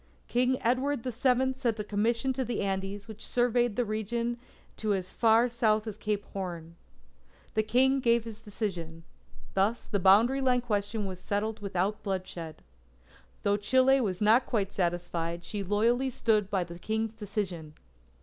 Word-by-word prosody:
King 250 +2 +2
Edward 255 +2 +1
the 255 - -2
Seventh 260 +2 +1
sent 235 -5 0
a - - -1
commission 230 +5 0
to 260 +1 -1
the 240 0 -2
Andes, 195 +1 -3
which 220 -1 -8
surveyed 240 -2 +1
the 245 - +1
region 235 +3 -2 0.4
to 215 -2 0
as 185 -1 -5
far 230 +1 +4
south 220 -3 +1
as 215 -3 -5
Cape 210 -1 -2
Horn. 170 -4 -5 0.8
The 215 - +2
King 260 +5 +3
gave 235 -2 +3
his 225 -1 -9
decision. 180 -7 -5 0.5
Thus 200 +5 +1
the 205 - -1
boundary 220 +9 +5 0.2
question 210 -2 -2
was 185 -2 -6
settled 210 +3 -2
without 200 +1 -1
bloodshed. 180 -5 -5 0.8
Though 205 0 +2
Chile 260 +5 +4
was 195 -3 -1
not 225 +5 +5
quite 200 -4 -1
satisfied, 175 -1 -2
she 200 +3 -4
loyally 230 +7 +2
stood 215 -5 +1
by 195 -3 +1
the 170 0 -10
King's 220 +2 -2
decision. 185 -7 -4
215 Hz, 155 wpm, -29 LUFS, 195-235 Hz, 0.8 s, boundary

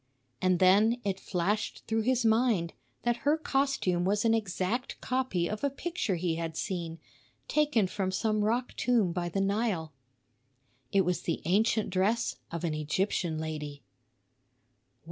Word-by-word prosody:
And 185 -1 +3
then 205 +6 +5
it 195 -2 -1
flashed 195 +4 -2
through 225 0 0
his 250 +1 +1
mind 220 -7 +2 0.3
that 240 -1 +1
her 290 +6 +2
costume 270 - 0
was 205 +4 +1
an 225 - +4
exact 220 +3 -1
copy 255 -10 0
of 215 +5 -5
a 280 - +3
picture 275 - -2
he 165 -1 -1
had 165 -1 -4
seen, 170 -4 -3 0.5
taken 295 -9 +2
from 190 0 -2
some 215 +2 0
rock 240 +4 0
tomb 230 -8 +2
by 175 0 -2
the 195 +3 -1
Nile. 195 -6 0 1.0
It 195 - +4
was 180 -1 0
the 165 - -2
ancient 210 +4 +2
dress 205 +6 +1
of 170 0 -4
an 165 -3 0
Egyptian 160 +2 -1
lady. 150 -2 -5
200 Hz, 145 wpm, -30 LUFS, 175-230 Hz, 1.0 s, then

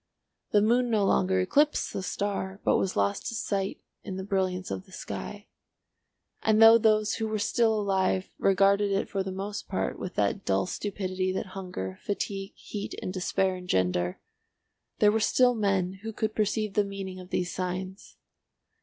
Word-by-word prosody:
The 205 -1 +4
moon 240 +3 +3
no 215 -3 +2
longer 190 -1 +2
eclipsed 290 +11 +2
the - - -3
star 195 0 -3
but - - +4
was 190 - -1
lost 100 0 0
to 230 - -3
sight 195 -3 -2 0.2
in 190 - -5
the 190 - -4
brilliance 190 -2 -1
of 190 - -5
the - - -18
sky. 205 +2 -6 1.0
And 220 0 +3
though 225 +1 +9
those 215 -1 +3
who 220 - -1
were 215 0 -1
still 220 +1 +2
alive 190 -2 0
regarded 200 +1 +3
it 195 +1 0
for 195 - -1
the 190 0 -3
most 200 +2 -5
part 190 - -2
with 185 - -6
that 100 -1 0
dull 95 0 +1
stupidity 185 - -2
that 190 - -3
hunger, 180 - -5
fatigue, 195 -1 -3
heat 205 -1 -6
and 185 - -4
despair 190 0 0
engender, 90 - 0 0.8
there 210 - +5
were 220 - +1
still 245 +3 +4
men 195 -4 0
who 225 +1 -5
could 215 0 -2
perceive 215 -1 0
the 210 - +3
meaning 195 -2 -6
of 180 0 -11
these 180 -1 -1
signs. 185 +1 -5
195 Hz, 170 wpm, -28 LUFS, 185-210 Hz, 1.0 s, though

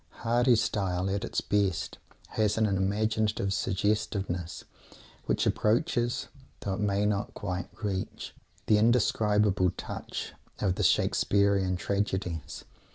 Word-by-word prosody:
Hardy's 120 0 +4
style, 95 -3 -1
at 100 0 -1
its - - -2
best, 100 -4 0 0.3
has 105 -1 +1
an 110 - +3
imaginative 105 +1 0
suggestiveness 95 -3 -1 0.6
which - - +1
approaches, 120 +1 +1 0.3
though 100 - -2
it 95 - -4
may 100 0 +1
not 105 -1 -1
quite 90 -3 -4
reach, 95 -2 -3 0.3
the 105 - +4
indescribable 105 -4 +3
touch - - -6 0.2
of 95 -3 +1
the - - -3
Shakespearean 100 -2 +2
tragedies. 95 -4 -2
100 Hz, 110 wpm, -29 LUFS, 95-110 Hz, 0.6 s, Hardy's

